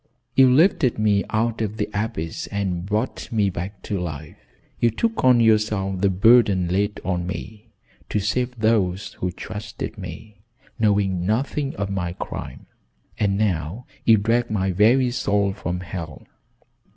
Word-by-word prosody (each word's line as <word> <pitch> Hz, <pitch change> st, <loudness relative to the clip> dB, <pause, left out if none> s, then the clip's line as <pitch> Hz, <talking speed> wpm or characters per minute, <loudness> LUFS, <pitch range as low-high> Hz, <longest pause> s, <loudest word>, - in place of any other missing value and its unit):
You 130 Hz, -1 st, +6 dB
lifted 145 Hz, -3 st, +3 dB
me 105 Hz, -2 st, +2 dB
out 115 Hz, +1 st, 0 dB
of 110 Hz, 0 st, -3 dB
the 105 Hz, -, -1 dB
abyss 100 Hz, -7 st, -3 dB
and 95 Hz, -3 st, -3 dB
brought 110 Hz, +5 st, -2 dB
me 105 Hz, -4 st, +2 dB
back 95 Hz, +4 st, -6 dB
to 100 Hz, -, -2 dB
life. 75 Hz, -4 st, -6 dB, 0.4 s
You 120 Hz, -, +4 dB
took 225 Hz, -, -1 dB
on 125 Hz, -2 st, +6 dB
yourself 105 Hz, -4 st, +2 dB
the 100 Hz, -, +4 dB
burden 95 Hz, -2 st, +4 dB
laid 100 Hz, +3 st, 0 dB
on 90 Hz, -1 st, -1 dB
me, 105 Hz, +4 st, -7 dB, 0.4 s
to 105 Hz, -, 0 dB
save 125 Hz, +5 st, -1 dB
those 105 Hz, -4 st, +1 dB
who 90 Hz, -, -1 dB
trusted 105 Hz, +4 st, -7 dB
me, 100 Hz, +2 st, -9 dB, 0.4 s
knowing 100 Hz, -4 st, +2 dB
nothing 135 Hz, +7 st, -1 dB
of 100 Hz, 0 st, -3 dB
my 90 Hz, -3 st, -2 dB
crime, -, -, -7 dB, 0.5 s
and 100 Hz, -2 st, +1 dB
now 95 Hz, +2 st, -1 dB, 0.2 s
you 115 Hz, -1 st, +6 dB
drag 115 Hz, +3 st, +1 dB
my 95 Hz, -3 st, 0 dB
very 120 Hz, +7 st, +4 dB
soul 100 Hz, -5 st, +1 dB
from 90 Hz, -1 st, -4 dB
hell. 85 Hz, -3 st, -7 dB
105 Hz, 150 wpm, -23 LUFS, 95-115 Hz, 0.5 s, You